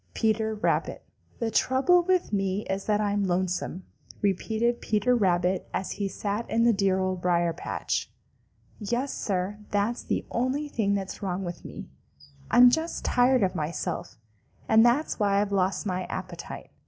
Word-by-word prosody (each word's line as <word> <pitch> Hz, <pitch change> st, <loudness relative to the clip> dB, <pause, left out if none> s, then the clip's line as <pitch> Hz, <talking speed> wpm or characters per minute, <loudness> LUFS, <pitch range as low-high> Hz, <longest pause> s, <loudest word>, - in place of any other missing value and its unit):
Peter 220 Hz, -1 st, +1 dB
Rabbit. 210 Hz, -, -1 dB, 0.3 s
"The 230 Hz, -1 st, -2 dB
trouble 270 Hz, +11 st, +3 dB
with 365 Hz, -, 0 dB
me 195 Hz, 0 st, 0 dB
is 195 Hz, 0 st, -3 dB
that 210 Hz, -1 st, +1 dB
I'm 205 Hz, -1 st, 0 dB
lonesome," 185 Hz, 0 st, -1 dB, 0.4 s
repeated 220 Hz, +4 st, 0 dB
Peter 215 Hz, +4 st, +2 dB
Rabbit 185 Hz, -3 st, +1 dB
as 190 Hz, -, -2 dB
he 200 Hz, -1 st, -2 dB
sat 205 Hz, +3 st, -3 dB
in 230 Hz, +1 st, +2 dB
the 235 Hz, 0 st, +5 dB
dear 195 Hz, -2 st, +2 dB
Old 185 Hz, -1 st, -1 dB
Briar 175 Hz, -1 st, +2 dB
patch. -, -, -3 dB, 0.7 s
"Yes, 240 Hz, +6 st, -2 dB
Sir, 195 Hz, +1 st, -2 dB
that's 205 Hz, +4 st, 0 dB
the -, -, -2 dB
only 260 Hz, +5 st, -1 dB
thing 205 Hz, -7 st, 0 dB
that's 195 Hz, +1 st, -5 dB
wrong 190 Hz, -1 st, -2 dB
with 175 Hz, -1 st, -6 dB
me. -, -, -8 dB, 0.6 s
I'm 245 Hz, 0 st, +7 dB
just 320 Hz, +4 st, -2 dB
tired 250 Hz, -1 st, +3 dB
of 185 Hz, -, +1 dB
myself, 160 Hz, 0 st, -4 dB, 0.5 s
and 220 Hz, 0 st, +6 dB
that's 245 Hz, +5 st, +2 dB
why 200 Hz, -1 st, +3 dB
I've 205 Hz, 0 st, 0 dB
lost 190 Hz, -1 st, 0 dB
my 185 Hz, -2 st, -2 dB
appetite. -, -, -7 dB
205 Hz, 155 wpm, -27 LUFS, 190-235 Hz, 0.7 s, I'm